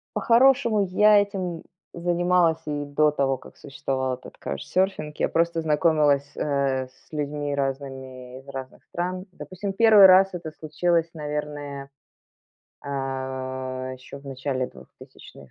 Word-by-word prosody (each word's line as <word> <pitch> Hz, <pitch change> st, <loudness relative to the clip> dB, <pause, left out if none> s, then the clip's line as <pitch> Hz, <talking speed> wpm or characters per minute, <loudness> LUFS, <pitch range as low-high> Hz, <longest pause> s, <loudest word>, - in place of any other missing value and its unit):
По-хорошему, 235 Hz, -3 st, +4 dB
я 210 Hz, +2 st, +6 dB
этим 185 Hz, -5 st, -3 dB, 0.3 s
занималась 175 Hz, -1 st, +2 dB
и 145 Hz, -1 st, -2 dB
до 150 Hz, +1 st, +3 dB
того, 135 Hz, -2 st, 0 dB
как -, -, -16 dB
существовал 130 Hz, -1 st, -3 dB
этот 125 Hz, -, -10 dB
каучсёрфинг. 155 Hz, -, -2 dB
Я -, -, +1 dB
просто 170 Hz, 0 st, +1 dB
знакомилась, 150 Hz, -2 st, +2 dB
э, 135 Hz, -3 st, 0 dB
с 130 Hz, 0 st, -27 dB
людьми 145 Hz, -1 st, -3 dB
разными 130 Hz, -2 st, -5 dB
из 135 Hz, -, -19 dB
разных 135 Hz, -1 st, -8 dB
стран. 180 Hz, +2 st, -4 dB
Допустим, 185 Hz, +5 st, -6 dB
1 215 Hz, -1 st, +7 dB
раз 190 Hz, +1 st, +7 dB
это 165 Hz, -3 st, -6 dB
случилось, 165 Hz, +2 st, 0 dB
наверное, 145 Hz, -2 st, -5 dB, 1.0 s
а, 130 Hz, -1 st, -4 dB
ещё 130 Hz, +2 st, -11 dB
в 140 Hz, -, -16 dB
начале 130 Hz, -1 st, -2 dB
2000. 65 Hz, +1 st, -15 dB
145 Hz, 125 wpm, -25 LUFS, 135-175 Hz, 1.0 s, 1